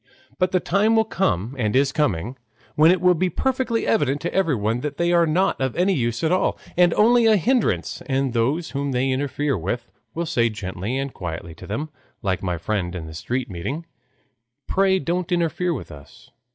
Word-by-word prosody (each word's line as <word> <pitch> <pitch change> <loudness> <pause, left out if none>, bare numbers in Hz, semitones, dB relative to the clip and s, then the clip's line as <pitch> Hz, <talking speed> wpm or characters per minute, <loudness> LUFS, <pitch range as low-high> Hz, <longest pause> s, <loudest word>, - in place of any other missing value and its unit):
But 185 -1 +2
the 185 - +3
time 205 +6 +2
will 220 0 +4
come 130 - -1
and 110 0 0
is 135 +1 +3
coming 120 - -1 0.4
when 155 +2 +5
it 185 +1 +4
will 180 0 +5
be 180 +2 0
perfectly 255 +3 -1
evident 145 -9 +1
to 170 - -3
everyone 125 - +1
that 145 +1 -4
they 170 0 +1
are 170 -1 +4
not 175 -1 +1
of 130 -2 -1
any 185 +3 +2
use 120 -4 -1
at 160 - +2
all, 185 - +1 0.2
and 175 -1 +5
only 235 +2 +5
a 215 -1 +5
hindrance, 245 +5 0
and 135 -2 0
those 135 +9 0
whom 140 -1 -2
they 130 +2 +1
interfere 140 +1 -1
with 110 +7 -4 0.2
will 170 +1 -1
say 120 -8 +1
gently 100 +3 -4
and 135 0 -3
quietly 85 -1 -6
to - - -12
them, 145 +10 -3 0.3
like 95 -2 0
my 90 -2 -2
friend 90 +1 -2
in 85 -3 -5
the 80 - -9
street 125 +10 -3
meeting, 135 - -4 0.8
"Pray 190 0 +3
don't 180 -1 -2
interfere 175 +1 0
with 150 - -5
us." 120 - -14
140 Hz, 195 wpm, -23 LUFS, 115-180 Hz, 0.8 s, when